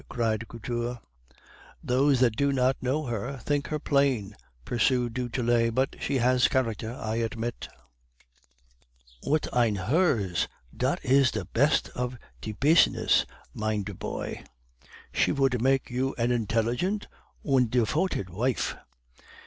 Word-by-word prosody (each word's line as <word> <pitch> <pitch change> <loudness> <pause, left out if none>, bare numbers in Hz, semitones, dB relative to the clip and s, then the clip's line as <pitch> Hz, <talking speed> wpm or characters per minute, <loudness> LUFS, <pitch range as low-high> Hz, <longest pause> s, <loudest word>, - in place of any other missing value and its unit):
cried 115 -2 -1
Couture. 120 +1 -4 0.9
"'Those 130 +1 +2
that 120 -4 +3
do 140 +2 +2
not 130 0 +2
know 135 +5 0
her 120 +2 -3
may - - -7
think 145 +3 -1
her 155 - -2
plain,' 135 -9 +1 0.3
pursued 120 0 +1
du 125 0 -3
Tillet, 115 -2 +1
'but 130 +1 +1
she 140 - -1
has 125 0 +4
character, 115 -3 -1
I 110 -3 -3
admit.' 115 +1 -3 1.5
"'Und 155 +2 0
ein 120 -4 +3
herz, 100 - +1 0.3
dot - - -1
is 135 0 +5
the 110 -6 -4
pest 140 - +2
of 125 0 -4 0.2
die 110 - -5
pizness, 155 +3 +4 0.3
mein 110 -1 -1
der 100 +1 -6
poy; - - -5 0.7
she - - +2
vould 135 -4 +1
make 135 +1 +1
you 130 +2 -1
an 120 0 +1
indelligent 120 - 0 0.4
und 130 -5 +2
defoted 125 - 0
vife. 120 +8 -1
125 Hz, 135 wpm, -27 LUFS, 115-135 Hz, 1.5 s, is